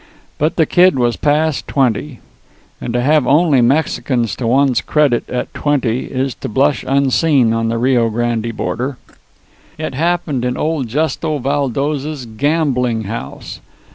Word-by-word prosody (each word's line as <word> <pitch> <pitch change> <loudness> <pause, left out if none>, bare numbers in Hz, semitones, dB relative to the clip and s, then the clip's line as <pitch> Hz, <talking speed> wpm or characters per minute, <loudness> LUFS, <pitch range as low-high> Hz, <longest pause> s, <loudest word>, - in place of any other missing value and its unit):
But 155 +2 +1
the 160 - +3
Kid 180 -1 +4
was 120 -2 +1
past 150 0 0
twenty; 130 0 -1 0.6
and 120 - -4
to 120 - +2
have 150 +1 +3
only 150 -3 +4
Mexicans 125 -3 0
to 120 - -2
one's 130 +1 +2
credit 145 -6 +1
at 125 - -4
twenty 130 -5 0
is 130 0 -2
to - - -4
blush 135 +3 +1
unseen 135 -2 +2
on 115 0 0
the 115 - -1
Rio 120 -1 +2
Grande 115 0 -2
border. 130 +3 -3 0.8
It 155 -3 -4
happened 165 -3 -1
in 125 0 -1
old 155 -5 -1
Justo 155 +4 -1
Valdos's 140 +1 -2
gambling 125 -2 0
house. 110 +3 -7
135 Hz, 140 wpm, -16 LUFS, 120-150 Hz, 0.8 s, Kid